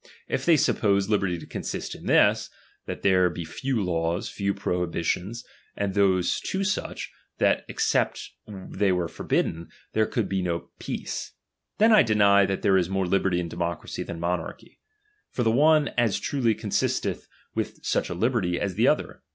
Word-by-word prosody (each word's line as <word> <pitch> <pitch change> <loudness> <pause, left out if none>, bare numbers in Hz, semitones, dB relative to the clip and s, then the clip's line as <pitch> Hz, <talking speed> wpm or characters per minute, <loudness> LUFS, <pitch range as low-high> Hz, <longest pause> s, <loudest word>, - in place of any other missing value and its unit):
If - - -2
they 165 -2 +6
suppose 100 -8 +2
liberty 100 -4 +1
to 85 - -10
consist - - -5
in - - -10
this, - - +4 0.4
that - - -6
there 95 -2 +4
be 85 0 -6
few 125 +6 -2
laws, 85 0 -1
few 100 -1 -1
prohibitions, 90 +3 -2 0.3
and 100 -1 -1
those 95 -3 +2
too 190 +1 -2
such, 205 +1 -3 0.3
that - - +2
except - - 0 0.2
they 95 0 -2
were 90 -2 0
forbidden, 85 0 -2 0.2
there 110 0 +2
could 115 -4 -1
be 95 -1 -1
no 85 -2 -3
peace; - - -5 0.4
then 220 +2 +5
I 215 - +8
deny 100 -3 +4
that 95 - -3
there 95 -2 +4
is 90 -1 -1
more 95 -1 0
liberty 95 -1 +1
in 85 - -3
democracy 85 0 -4
than 85 - -6
monarchy; 85 -1 -4 0.5
for 125 - -2
the 110 - +3
one 150 +4 +4
as 120 -4 +1
truly 125 -6 0
consisteth - - -1 0.3
with - - -4
such - - 0
a 85 - -4
liberty, 95 -4 0
as 100 -2 -2
the - - +2
other. - - 0
95 Hz, 165 wpm, -26 LUFS, 90-110 Hz, 0.5 s, I